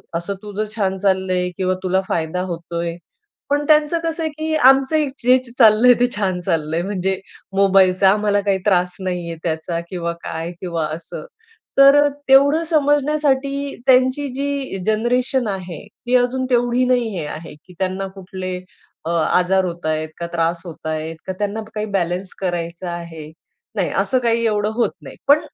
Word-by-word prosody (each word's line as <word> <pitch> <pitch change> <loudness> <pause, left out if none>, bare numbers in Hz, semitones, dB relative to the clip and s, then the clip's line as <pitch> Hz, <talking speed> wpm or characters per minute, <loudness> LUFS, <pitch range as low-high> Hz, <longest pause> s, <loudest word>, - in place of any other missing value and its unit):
असं 170 +4 -2
तुझं 210 0 -3
छान 195 -3 0
चाललंय 190 -2 +1
किंवा 185 -1 +1
तुला 190 0 +1
फायदा 165 +2 -1
होतोय. 170 0 -4 0.6
पण 290 +1 +1
त्यांचं 305 +2 +4
कसं 330 0 -2
आहे 315 - -1
की 315 0 -1
आमचं 270 +2 +4 0.2
जे 250 +2 +5 0.2
चाललंय 230 +1 +7
ते 245 - +5
छान 190 -3 0
चाललंय, 165 -2 -1
म्हणजे 190 0 -2 0.4
मोबाईलचा 190 -1 +5
आम्हाला 205 0 +2
काहीतरी 195 -2 0
त्रास 180 -1 +1
नाहीये 175 -3 -3
त्याचा 165 +1 -2
किंवा 170 -2 -3
काय 165 +1 -4
किंवा 170 -3 -2
असं. 165 - -8 0.5
तर 275 +1 +8 0.3
तेवढं 280 +4 +5
समजण्यासाठी 285 -2 +1
त्यांची 260 +2 +4
जी 280 -5 -3
जनरेशन 245 +3 +1
आहे 185 -3 -6 0.2
ती 250 - +3
अजून 250 +1 +1
तेवढी 245 0 +2
नाही 250 -2 +2
हे 150 - -4
आहे, 155 +2 -8
की 165 +5 -18
त्यांना 190 +1 -1
कुठले 185 -1 -6 0.5
अ, - - -1
आजार 180 +3 +2
होत 175 -2 -5
आहेत 155 0 -1
का? 170 - -3
त्रास 170 0 0
होत 165 -2 -10
आहेत 155 +1 -3
का? 190 - -2
त्यांना 205 +1 -2
काही 215 0 -2
बॅलन्स 180 +1 -2
करायचा 175 -1 -3
आहे? 165 -3 -7 0.5
नाही, - - 0
असं 260 - +2
काही 230 -1 +1
एवढं 210 -1 +1
होत 235 +1 +1
नाही, - - -11
पण 290 +2 +7
195 Hz, 155 wpm, -20 LUFS, 175-255 Hz, 0.6 s, तर